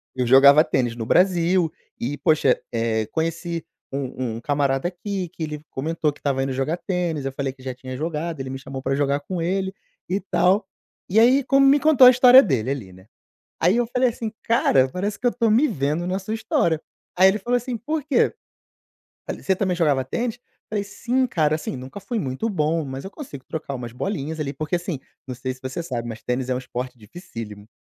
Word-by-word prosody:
Eu 125 -1 0
jogava 140 +4 +7
tênis 125 -6 0
no 115 -1 -4
Brasil 180 -1 +3 0.3
e, 140 +5 -3
poxa, 155 -6 +3
eh, 115 -2 0
conheci 165 +1 -2 0.3
um 130 -4 -3
um - - -7
camarada 140 +2 0
aqui 185 0 -4
que 170 - -8
ele 150 -1 -5
comentou 155 +2 -1
que - - -20
estava 135 -2 0
indo 135 0 -1
jogar 135 +6 -1
tênis, 175 -6 -2
eu 135 - -2
falei 135 -1 -3
que 130 -1 -18
já 130 -1 -4
tinha 130 0 -8
jogado. 160 0 -3
Ele 130 0 -4
me 135 - -5
chamou 135 -1 -7
pra 135 0 0
jogar 140 0 +1
com 180 +3 -4
ele 190 +2 -1 0.4
e 195 +3 0
tal. 185 +2 +2 0.4
E 205 +4 +2
aí, 255 +4 +6
como 275 0 +4
me 280 +2 +6
contou 290 -4 +7
a - - +11
história 255 +1 +8
dele 130 - 0
ali, 110 -10 -4
né. 95 +2 -16 0.5
Aí 180 +7 +4
eu 240 -1 +2
falei 250 +1 +2
assim: 225 -1 -5
"Cara, 135 - +3
parece 200 +7 -3
que 250 - -3
eu 240 - +3
tô 230 -3 +1
me 250 +8 +4
vendo 155 - -1
na 185 +1 -1
sua 215 +3 -4
história". 170 -8 +1 0.4
Aí 190 +1 +7
ele 205 +3 +2
falou 240 +5 0
assim: 245 0 -3
"Por 305 +6 -3
quê?" 280 -5 +2 0.9
Falei: - - -5
"Você 190 - +2
também 185 -2 0
jogava 145 -6 +2
tênis?" 235 - -2
Eu - - -48 0.3
falei: 205 -1 0
"Sim, 245 +5 -1
cara. 155 -7 +1
Assim, 155 -3 -4
nunca 130 +10 -8
fui 230 +2 -3
muito 135 - -2
bom, 160 -3 0
mas 135 0 -6
eu 195 - -7
consigo 145 - -9
trocar 155 -3 -5
umas 120 -2 -6
bolinhas 160 0 -3
ali". 140 -2 -2
Porque, 155 +3 -2
assim, 175 -5 -3 0.3
não 125 - -5
sei 130 +1 -4
se 125 - -18
você 130 +5 -4
sabe, 120 -7 -4
mas 115 -1 -7
tênis 125 +1 -2
é 125 - +1
um - - 0
esporte 125 0 -6
dificílimo. 110 - -9
160 Hz, 215 wpm, -23 LUFS, 130-200 Hz, 0.9 s, a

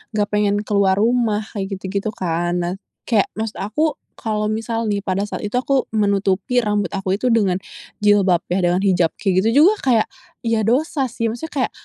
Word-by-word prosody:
nggak 205 -1 +1
pengen 210 -1 +2
keluar 200 -2 +2
rumah, 220 -1 +1
kayak 195 -2 -3
gitu-gitu 195 +2 -3
kan. 175 0 -1
Nah 175 +1 -2 0.3
kayak 215 -5 +2
maksud 220 0 -4
aku, 290 +9 -1 0.2
kalau 215 -1 -2
misal 225 +1 -2
nih 200 -1 -1
pada 195 +1 -1
saat - - -6
itu 205 - -4
aku 265 0 +1
menutupi 200 +2 +1
rambut 205 -3 0
aku 195 +1 -1
itu 255 - 0
dengan 200 -6 +2 0.4
jilbab 200 -4 +4
ya 180 +2 +1
dengan 175 +1 +2
hijab 180 -4 +2
kayak 190 -1 +2
gitu 230 +6 +3
juga 405 - +6
kayak, 235 -5 +3 0.3
ya 230 -2 0
dosa 270 +5 +1
sih 230 -1 -1
maksudnya 280 +2 -2
kayak, - - -32
210 Hz, 180 wpm, -20 LUFS, 195-230 Hz, 0.4 s, juga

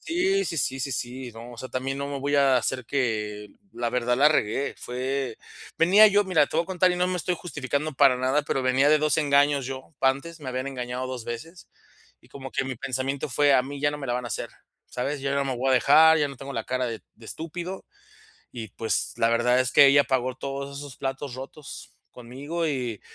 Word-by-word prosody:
Sí 380 +3 +1
sí 165 - -4
sí 135 0 -1
sí 135 - -2
sí, 125 +1 -5
no, 115 +2 -10
o - - -12
sea, 130 - -6
también 135 +1 -3
no 140 - -3
me 140 -1 -4
voy 145 +1 -1
a 135 -2 +4
hacer 130 +1 -1
que 105 -6 -2 0.2
la 120 -1 -2
verdad, 125 0 0
la 145 +3 +5
regué, 135 -2 0
fue 130 -1 -3 0.4
venía 195 +6 +7
yo, 205 0 +3
mira, 160 -6 +3
te - - -4
voy 165 - +2
a - - -23
contar, 185 -1 +2
y - - -2
no 180 0 +1
me 185 - -1
estoy 180 +1 -1
justificando 150 -2 -3
para 135 -2 +5
nada, 130 +4 +1
pero 135 -1 -1
venía 130 +3 +3
de 155 0 +5
2 155 0 +1
engaños 140 -2 +3
yo. 130 +3 -8
Antes 140 +5 0
me 135 - -7
habían 130 +1 -3
engañado 125 -1 -4
2 125 -3 -6
veces, 160 +9 -8 0.5
y - - -23
como 135 -1 -9
que 135 - 0
mi 130 -2 -5
pensamiento 130 +3 -3
fue: 145 +2 +3
"A 125 - +4
mí 140 +2 -7
ya 145 0 +2
no 150 - -6
me 135 - -6
la 120 - -1
van 125 0 -3
a - - -5
hacer", 105 - -4 0.4
¿sabes?, 140 +3 -3
yo 140 0 -1
no 140 - +1
me 130 -2 -2
voy 135 +2 0
a - - +5
dejar, 160 +5 +6
ya 145 - +1
no 140 - -9
tengo 140 +2 -8
la 115 -3 -3
cara 130 0 -1
de 115 -2 -5
de 115 0 -15
estúpido. 175 +4 -6 0.7
Y 115 -3 -7
pues, 110 +2 -2
la 115 - +3
verdad 125 +2 +3
es 130 -1 -1
que 140 - +8
ella 140 +1 +6
pagó 130 -2 0
todos 140 +1 -5
esos 145 -2 -9
platos 135 -1 -4
rotos 135 +2 -10 0.2
conmigo. 140 +8 -5
Y 125 -6 -3
135 Hz, 235 wpm, -25 LUFS, 125-145 Hz, 0.7 s, que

